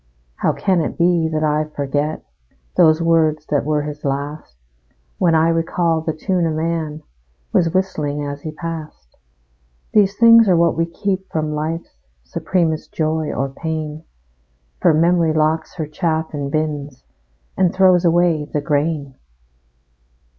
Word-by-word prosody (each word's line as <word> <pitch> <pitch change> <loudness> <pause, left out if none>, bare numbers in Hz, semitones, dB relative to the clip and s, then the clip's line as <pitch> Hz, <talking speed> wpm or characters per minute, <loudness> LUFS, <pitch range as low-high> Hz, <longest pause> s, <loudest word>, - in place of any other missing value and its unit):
How - - +1
can 185 -4 +1
it - - -4
be 170 -2 +2
that 155 0 -1
I 155 0 +1
forget 145 +2 -2 0.5
Those 160 -1 +4
words 160 -2 +2
that 145 - +2
were 150 -1 0
his 150 0 -7
last, 140 - -4 0.6
When 170 -2 +3
I 160 +1 +4
recall 165 0 0
the 160 - -2
tune 175 +2 -1
a - - 0
man 160 -1 -3 0.5
Was 165 -2 +3
whistling 150 -6 -1
as 145 0 -6
he 155 - -5
passed? 155 - -8 0.8
These 200 -1 +3
things 230 -2 +7
are 180 - +4
what 170 0 +3
we 165 +1 0
keep 190 +2 -3
from 155 -1 -2
life's 160 +3 -4 0.2
Supremest 160 - -1
joy 155 -1 -1
or 135 +2 -2
pain; 155 +1 -5 0.8
For - - +5
memory 165 0 +3
locks 155 +1 0
her 160 - -3
chaff 160 +1 -2
in 140 -2 -3
bins 145 -3 -3 0.5
And 185 -2 +2
throws 185 -2 +4
away 170 -3 +2
the 150 - -3
grain. 145 -1 -1
160 Hz, 145 wpm, -19 LUFS, 150-170 Hz, 0.8 s, things